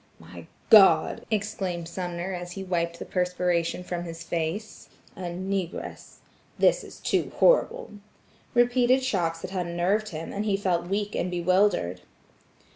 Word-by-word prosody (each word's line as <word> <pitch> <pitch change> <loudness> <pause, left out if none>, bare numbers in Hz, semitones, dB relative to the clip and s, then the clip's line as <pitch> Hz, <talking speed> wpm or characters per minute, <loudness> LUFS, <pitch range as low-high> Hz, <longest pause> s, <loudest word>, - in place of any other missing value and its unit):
"My 85 0 -12 0.2
God!" 190 -7 +6
exclaimed 195 -5 -2
Sumner 175 +1 -4
as 175 0 -6
he 195 - -6
wiped 170 -2 -1
the - - -7
perspiration 180 -1 0
from 175 -1 -4
his 165 -1 -7
face, 170 +6 -4 0.3
"a 180 -2 -5
negress! 185 0 -4 0.4
this - - +3
is - - -12
too - - 0
horrible." - - +3 0.6
Repeated 245 +2 +4
shocks 170 -9 -1
had 185 -2 -3
unnerved 185 +5 0
him, 160 0 -6
and 205 - -2
he 200 -2 +1
felt 175 -3 0
weak 205 +2 -2
and 180 - -1
bewildered. 180 - +1
180 Hz, 135 wpm, -26 LUFS, 170-200 Hz, 0.6 s, God